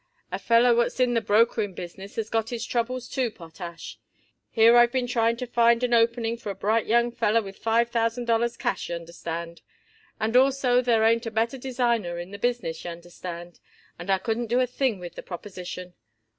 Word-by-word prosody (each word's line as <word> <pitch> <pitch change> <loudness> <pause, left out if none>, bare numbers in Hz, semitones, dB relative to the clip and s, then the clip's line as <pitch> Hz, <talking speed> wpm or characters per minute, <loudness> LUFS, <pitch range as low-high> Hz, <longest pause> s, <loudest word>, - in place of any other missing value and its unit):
"A - - -3
feller 235 +1 +4
what's 235 +2 0
in 250 -1 +3
the 230 - +2
brokering 215 -2 +2
business 190 +3 -9
has 220 -1 -2
got 225 0 -1
his 240 -2 -4
troubles, 245 +1 -2
too, 255 -3 -1
Potash. 170 -2 -10 0.5
Here 230 +1 +5
I've 240 0 +6
been 255 -1 0
trying 230 -1 +1
to 250 - -4
find 235 0 +3
an 245 -1 +1
opening 230 0 +2
for 220 - -7
a 200 - -4
bright 215 +4 0
young 235 +2 +3
feller 230 -1 +2
with 195 -3 -8
five 230 +1 +1
thousand 230 +1 0
dollars 235 0 +1
cash, 240 -1 -2
y'understand, 170 0 -6 0.6
and 225 +2 -1
also 260 -1 +4
there 235 -3 +2
ain't 230 +1 +3
a - - -1
better 230 +4 -1
designer 235 -8 -1
in 175 +2 -7
the 200 - -8
business, 235 -9 -2
y'understand, 175 0 -8 0.4
and 175 - -8
I 195 - +4
couldn't 225 +4 -2
do 240 +3 +2
a 255 - +3
thing 250 -2 -1
with 175 -1 -8
the - - -8
proposition. 180 -1 -8
230 Hz, 190 wpm, -25 LUFS, 195-240 Hz, 0.6 s, I've